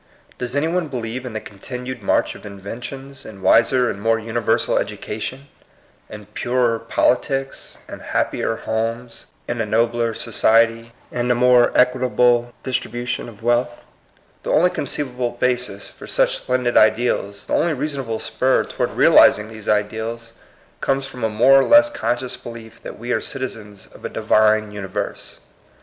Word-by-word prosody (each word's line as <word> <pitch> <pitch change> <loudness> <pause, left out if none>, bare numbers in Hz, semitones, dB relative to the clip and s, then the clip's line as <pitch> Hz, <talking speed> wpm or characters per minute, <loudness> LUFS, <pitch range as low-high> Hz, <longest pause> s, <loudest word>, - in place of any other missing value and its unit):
Does 125 +1 -3
any 145 +3 +1
one 175 0 -1
believe 125 -1 -5
in 120 - -7
the 110 - -3
continued 125 +5 -8
march 95 - +1
of - - -14
inventions, 120 +7 -8
in 100 -3 -11
wiser 125 +2 +4
and 100 - -4
more 115 +1 +2
universal 115 0 0
education, 130 +6 -5 0.6
in 105 -1 -10
purer 120 +2 0
politics, 135 +4 -1
in - - -9
happier 115 - -1
homes, 115 +2 -4 0.2
in 120 -1 -2
a - - 0
nobler 115 +1 +1
society, 115 0 +2 0.2
in 125 0 -2
a 125 - +3
more 125 0 +5
equitable 125 -1 +3
distribution 120 -2 -3
of 110 -1 -15
wealth? 120 0 0 0.6
The - - -6
only 180 +3 +4
conceivable 125 -4 -3
basis 125 -5 -1
for - - -13
such - - +2
splen 125 0 -1
did 120 -1 +1
ideals, 110 -2 +2
the - - -5
only 170 - +2
reasonable 135 -5 -3
spur 130 +3 +1
toward - - -2
realizing 105 +1 +5
these 110 -2 -8
ideals, 110 +2 -2 0.5
comes 135 0 0
from 125 -3 -9
a 110 - +2
more 125 +6 +5
or - - +3
less 295 0 +6
conscious 125 - -2
belief 115 -1 -11
that - - -9
we 120 +2 -5
are - - +1
citi 130 -2 -3
zens 105 -3 -14
of - - -16
a - - -3
Divine 110 0 +2
universe. 100 0 -6
120 Hz, 155 wpm, -21 LUFS, 110-125 Hz, 0.6 s, less